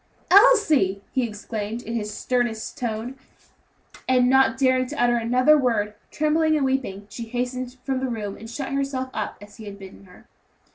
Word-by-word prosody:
"Elsie!" 310 - +5
he 260 - 0
exclaimed, 220 0 -5
in 230 - -6
his 210 -2 -3
sternest 240 0 -2
tone; 245 0 -4 0.9
and 250 -1 +4
not 265 0 +4
daring 255 -1 +2
to 300 - -7
utter 240 0 +3
another 250 +6 +4
word, 225 -7 +1 0.2
trembling 310 +1 +1
and 280 - +1
weeping, 255 -7 -2
she 230 +2 -7
hastened 250 +1 -4
from 265 -1 -1
the 260 0 -2
room, 210 -4 -4
and 225 - -10
shut 270 +4 -5
herself 275 -2 -2
up 215 - -4
as 205 0 -14
he 220 - -10
had 200 -1 -8
bidden 195 0 -13
her. 180 -1 -18
245 Hz, 175 wpm, -24 LUFS, 215-265 Hz, 0.9 s, Elsie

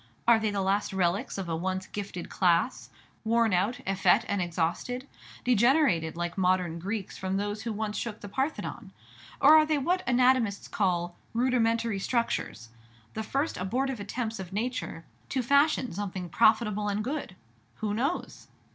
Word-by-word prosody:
Are 235 -1 +7
they 220 -1 0
the 200 -1 -1
last 195 +1 0
relics 190 +6 0
of 190 -2 -4
a 165 - -1
once 185 +3 -2
gifted 200 -4 -6
class, 180 +7 +1 0.3
worn 230 -1 +2
out, 195 +7 +1
effete, 195 0 +3
and 200 -2 0
exhausted, 175 +10 -2 0.4
degenerated 235 - +3
like 175 +2 -3
modern 180 -2 +1
Greeks 200 +2 -4
from 190 0 -1
those 205 +1 -2
who 230 - -3
once 215 0 -3
shook 225 -2 -5
the 205 - -7
Parthenon? 265 +9 -3 0.5
Or 295 +3 +8
are 310 -1 +7
they 305 -1 +2
what 355 +7 +1
anatomists 250 -4 +3
call 175 -3 0 0.2
"rudimentary 230 -3 +1
structures," 195 - -2 0.4
the 220 - -3
first 275 +8 -1
abortive 250 +6 -1
attempts 220 +2 -4
of 185 -1 -7
nature 215 -6 -3 0.2
to 260 -2 -1
fashion 280 - +3
something 185 -2 -4
profitable 210 +2 +3
and 205 +1 -1
good? 270 -6 -4 0.4
Who 210 -1 -2
knows? 270 +11 -3
210 Hz, 155 wpm, -28 LUFS, 190-245 Hz, 0.5 s, Or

